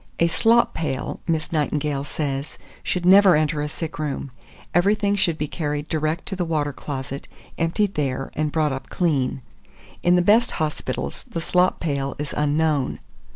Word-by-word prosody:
"A 170 - +4
slop 230 +8 +3
pail," 135 -5 -3
Miss 160 -2 -1
Nightingale 150 -2 0
says, 140 -1 -3 0.2
"should 180 -1 -2
never 190 -1 +7
enter 155 0 +1
a 150 - -2
sick 155 0 -6
room; 145 -2 -3 0.4
everything 200 +3 +3
should 180 -5 +1
be 150 - -2
carried 150 -1 -3
direct 155 +1 -1
to 195 - -3
the 180 - -1
water 150 -4 -1
closet, 135 0 -6 0.3
emptied 185 +5 +1
there, 135 -3 -2
and 155 0 -1
brought 155 -3 +1
up 135 - -6
clean; 140 -7 0 0.6
in 175 0 +4
the 180 - +4
best 225 +6 +5
hospitals 155 -1 -3
the 200 - -3
slop 180 +2 +2
pail 140 -4 -2
is 150 0 -4
unknown." 150 -2 +1
155 Hz, 160 wpm, -23 LUFS, 145-175 Hz, 0.6 s, never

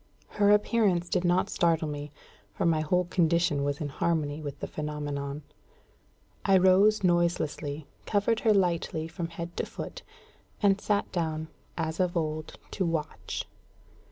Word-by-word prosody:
Her 205 -1 +2
appearance 205 -4 +3
did 180 - +1
not 180 +1 +2
startle 165 -3 +2
me, 145 -1 -5 0.4
for - - -1
my 160 -2 +3
whole 180 +4 +1
condition 170 -4 +2
was 145 0 -1
in 150 - -3
harmony 150 0 -1
with 145 -2 -6
the - - -3
phenomenon. 145 -1 -4 1.0
I 195 -1 +5
rose 195 +3 +5
noiselessly, 160 -4 0 0.2
covered 215 +2 +2
her 225 - +3
lightly 170 -5 +1
from 170 +1 -4
head 170 +1 -7
to - - 0
foot, - - -7 0.6
and 200 -1 +3
sat 205 -1 0
down, 160 -2 -2 0.3
as 160 -1 -2
of 180 -1 +1
old 155 -1 -3
to 195 - -1
watch. 165 -3 -3
170 Hz, 145 wpm, -28 LUFS, 155-185 Hz, 1.0 s, I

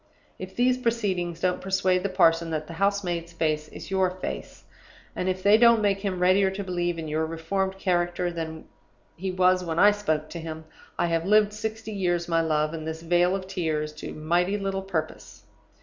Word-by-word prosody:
If - - -8
these 250 +1 +2
proceedings 190 -8 -1
don't 180 -1 0
persuade 190 -1 +1
the 200 - -1
parson 165 -2 +3
that 155 -1 -2
the 165 - -9
house 200 +3 +1
maid's 170 -1 -3
face 155 -2 -1
is 155 - -10
your 190 -1 +2
face, 185 +1 -7 0.5
and 185 - -1
if 185 0 -3
they 205 +2 +6
don't 235 -1 +6
make 200 -1 +2
him 195 -2 -2
readier 185 +2 +4
to 195 +1 -5
believe 175 -2 -2
in 160 -1 -5
your 155 +1 -1
reformed 190 +4 -2
character 175 -1 0
than 160 -1 -6 0.5
he 190 +3 -4
was 185 0 +3
when 165 -2 -3
I 205 +4 +7
spoke 155 -7 -1
to 170 - -6
him, 160 -1 -7 0.3
I 175 - +1
have 165 -1 0
lived 210 0 +4
sixty 220 +1 -5
years, 175 -4 -1
my 165 -1 +2
love, 155 -1 0
in 160 -1 -5
this 160 +1 -5
vale 175 +2 +3
of 190 -1 -4
tears 155 -5 -2
to - - -6
mighty 175 +6 0
little 195 -1 -2
purpose. 170 -5 -5
180 Hz, 195 wpm, -26 LUFS, 165-195 Hz, 0.5 s, I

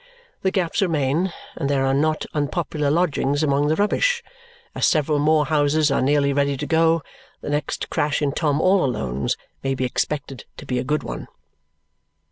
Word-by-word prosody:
The 190 - +2
gaps 185 0 0
remain, 165 0 +1 0.2
and 140 - -2
there 135 -1 +1
are 135 - +2
not 155 +3 +1
unpopular 150 0 -1
lodgings 145 -3 +1
among 145 0 +2
the 155 - +2
rubbish. 475 - +1 0.5
As - - +2
several 150 -2 +2
more 150 0 +3
houses 150 0 +2
are - - +2
nearly 140 +1 +2
ready 140 0 +1
to - - -4
go, 165 -1 +2 0.4
the - - -4
next 145 0 -2
crash 145 -1 0
in 145 -2 0
Tom 145 -1 0
all 185 +2 +3
Alone's 70 - -1 0.3
may 135 0 0
be 130 - -1
expected 135 +1 -3
to - - -9
be 125 -1 -1
a - - -2
good 150 +3 -1
one. - - -6
145 Hz, 175 wpm, -22 LUFS, 140-160 Hz, 0.5 s, more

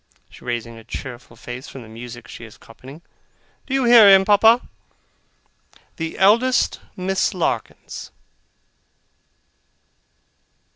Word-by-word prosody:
raising 115 -1 -5
her 115 - -13
cheerful 120 0 -9
face 125 +2 -9
from 130 - -10
the - - -14
music 120 +1 -10
she - - -11
is 115 -2 -13
copying. 135 +8 -15 0.6
'Do 270 - -2
you 270 - +1
hear 235 -4 +8
him, 195 0 +6
Papa? 220 +4 +4 1.3
The 165 -1 -5
eldest 230 +7 +3 0.2
Miss 190 +1 -1
Larkins. 175 - -4
160 Hz, 105 wpm, -21 LUFS, -, 1.3 s, hear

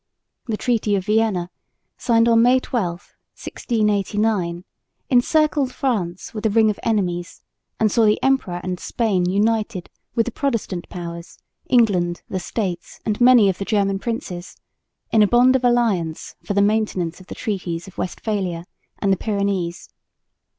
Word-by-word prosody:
The 220 -2 -2
treaty 220 -4 +1
of 190 -2 -2
Vienna, 210 -5 +1 0.4
signed 230 -1 +2
on 230 -1 +5
May 250 +2 +5
12, 235 -8 -1 0.5
1689, 210 -5 -1 0.5
encircled 285 +1 +3
France 200 -11 -2
with 215 -1 -5
a 220 - +3
ring 220 0 +4
of 205 - -8
enemies, 180 -6 -2 0.4
and 215 -2 +2
saw 230 +1 +3
the 210 - +3
Emperor 265 -10 +1
and 180 -1 -3
Spain 195 -7 0
united 210 -1 0 0.2
with 230 - +2
the 245 - -3
Protestant 230 -10 -3
powers, 170 -1 -8 0.3
England, 185 -8 +2
the 185 - -2
States 180 -2 -4
and 215 +1 -1
many 245 -4 +7
of 190 -2 0
the - - -2
German 195 -2 +1
princes 185 -6 -5 0.5
in 220 - +4
a 210 - +6
bond 245 +4 +5
of 260 - +1
alliance 220 -10 +1
for 205 - -3
the 200 - +4
maintenance 200 -6 0
of 185 - -15
the - - -8
treaties 180 -4 -4
of 190 - -12
Westphalia 185 -3 -3 0.3
and 195 -1 +1
the - - 0
Pyrenees. 200 -5 -2
210 Hz, 150 wpm, -21 LUFS, 180-230 Hz, 0.5 s, many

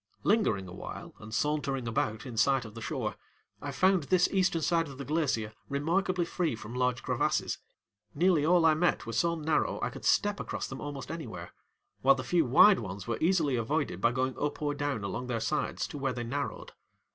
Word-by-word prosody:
Lingering 195 - +2
a 90 - -9
while 95 - -8
and 110 0 -10
sauntering 135 -1 -1
about 110 -1 -1
in 125 -3 -7
sight 130 +2 +3
of 110 - -10
the 115 - -8
shore, - - -3 0.4
I 145 - -4
found 185 +1 +3
this 180 +3 +4
eastern 185 -4 +1
side 165 0 +2
of 135 -2 -10
the 140 - -6
glacier 140 -9 0 0.2
remarkably 175 +5 0
free 170 -6 -1
from 110 +1 -9
large 125 -1 0
crevasses. - - 0 0.6
Nearly 170 -1 +3
all 170 +1 +4
I 160 - +6
met 170 +3 +1
were 115 - -5
so 170 +9 +2
narrow 155 -1 0
I - - -1
could - - -10
step 205 0 +2
across - - -4
them 135 - -7
almost 145 0 -6
anywhere, 110 - -7 0.5
while 135 +1 +6
the 130 - -4
few 165 +5 +2
wide 190 - +7
ones 95 +1 -6
were 115 -1 -2
easily 160 -5 +2
avoided 120 - -1
by 115 - +4
going 130 +1 -1
up 145 0 -2
or 145 -1 -1
down 145 -6 -2
along 120 +5 -4
their 120 -2 -1
sides 130 +7 -1
to 145 - -6
where 135 -2 -1
they 120 -1 -4
narrowed. 140 +5 -4
140 Hz, 205 wpm, -30 LUFS, 120-165 Hz, 0.6 s, wide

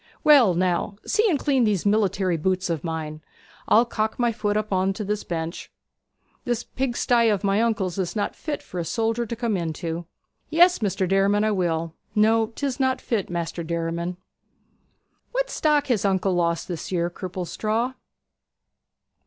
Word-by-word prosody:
Well, 260 - +6
now, 185 +3 0
see 435 +1 +2
and 320 - +2
clean 270 -2 +2
these 210 -5 +1
military 195 -3 +2
boots 185 +2 0
of 160 -3 -2
mine. 155 -2 -4 0.5
I'll 230 +3 +5
cock 220 -2 -2
my 240 -1 +2
foot 210 -2 -1
up 215 -1 -2
on 190 +1 +2
this 210 +1 -3
bench. 165 0 -5 0.7
This 240 -1 -1
pigsty 240 -2 +1
of 205 -2 0
my 200 +2 +2
uncle's 205 -6 0
is 185 +1 -2
not 205 - -1
fit 300 -2 -4
for 180 - -6
a - - -1
soldier 225 +7 -1
to 235 - -4
come 230 -2 -1
into.' 165 0 -3 0.4
'Yes, 350 +1 +5
Maister 195 -2 0
Derriman, 195 +2 +2
I 215 - +2
will. 165 -4 -1 0.2
No, 220 +1 +4
'tis 265 +4 -4
not 260 -1 +1
fit, 220 -5 -2
Maister 170 0 -3
Derriman.' 170 +1 -3 1.2
'What - - -1
stock 300 -2 +2
has 240 -8 0
uncle 195 -1 +1
lost 170 -2 0
this 175 -1 -5
year, 175 -1 0
Cripplestraw?' 215 +7 -2
200 Hz, 160 wpm, -24 LUFS, 175-235 Hz, 1.2 s, Well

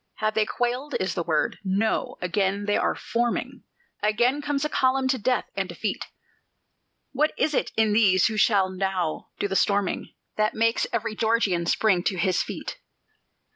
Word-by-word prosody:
Have 215 0 -1
they 215 -1 +1
quailed? 250 +4 -2
is 185 -2 -1
the 175 - -2
word. 160 -2 0
No: 200 +3 0
again 195 +2 0
they 205 - +1
are - - +1
forming 235 +1 -2 0.4
Again 240 +7 +2
comes 290 0 -1
a - - -1
column 260 -1 +2
to 260 -1 +1
death 250 +4 +1
and - - -2
defeat! - - -3 1.1
What 300 +3 +1
is 310 - +1
it - - 0
in 220 -1 +3
these 195 -4 +4
who 220 - +1
shall 200 -2 +3
now 185 -3 -2
do - - -1
the 195 - -3
storming 200 -1 0 0.2
That 215 0 +1
makes 230 +1 +2
every 225 -1 -2
Georgian 210 -7 +1
spring 195 -1 +3
to 190 - 0
his 180 +1 +1
feet? - - -6
215 Hz, 170 wpm, -25 LUFS, 190-240 Hz, 1.1 s, these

